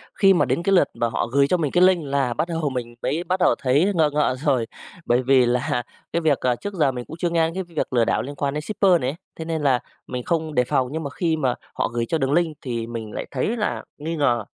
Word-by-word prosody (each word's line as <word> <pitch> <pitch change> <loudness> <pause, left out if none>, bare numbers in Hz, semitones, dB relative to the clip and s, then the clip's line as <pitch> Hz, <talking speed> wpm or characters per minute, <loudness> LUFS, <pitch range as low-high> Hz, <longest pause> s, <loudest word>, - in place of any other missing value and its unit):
Khi 195 -1 +5
mà 175 - +3
đến 170 - -1
cái 195 +2 +2
lượt 175 -6 +5
mà 120 - 0
họ 115 - -1
gửi 140 +3 +3
cho 180 - +2
mình 150 -5 -1
cái 180 - +4
link 185 -3 +4
là 135 -3 0
bắt 165 - -1
đầu 165 -3 -1
mình 120 -3 -5
mới 165 +4 -1
bắt 185 +2 -1
đầu - - +4
thấy 145 +9 +3
ngờ 155 -3 +4
ngợ 150 -3 +2
rồi, 130 -6 +2 0.4
bởi 120 +1 +3
vì 130 -1 +5
là 125 0 0 0.3
cái 170 - +1
việc, 155 -4 +2
à, 125 -1 +1
trước 205 +7 -6
giờ 150 -7 +2
mình 125 -1 -6
cũng 160 - -9
chưa 175 +1 0
nghe 165 -1 +2
đến 165 - -6
cái 190 - -3
việc 165 -6 -4
lừa 120 -2 +3
đảo - - +1
liên 140 +3 -6
quan 140 -1 -1
đến 150 - -2
shipper 190 -2 +2
này 125 - 0
ấy, 140 - -4 0.2
thế 160 - -4
nên 160 -1 -2
là 130 -4 +3 0.3
mình 125 -1 -4
không 160 -2 -1
đề 125 - +4
phòng. 125 +1 0
Nhưng 160 0 -3
mà 140 - -3
khi 165 +2 0
mà 130 -5 0 0.2
họ - - 0
gửi 120 -1 0
cho 165 - 0
đường 135 -1 0
link 165 -2 +1
thì 115 -3 -3
mình 115 -2 -6
lại - - -4
thấy 145 - -1
là 210 - -2
nghi 160 +3 -4
ngờ, 120 -7 +1
145 Hz, 285 wpm, -23 LUFS, 125-165 Hz, 0.4 s, Khi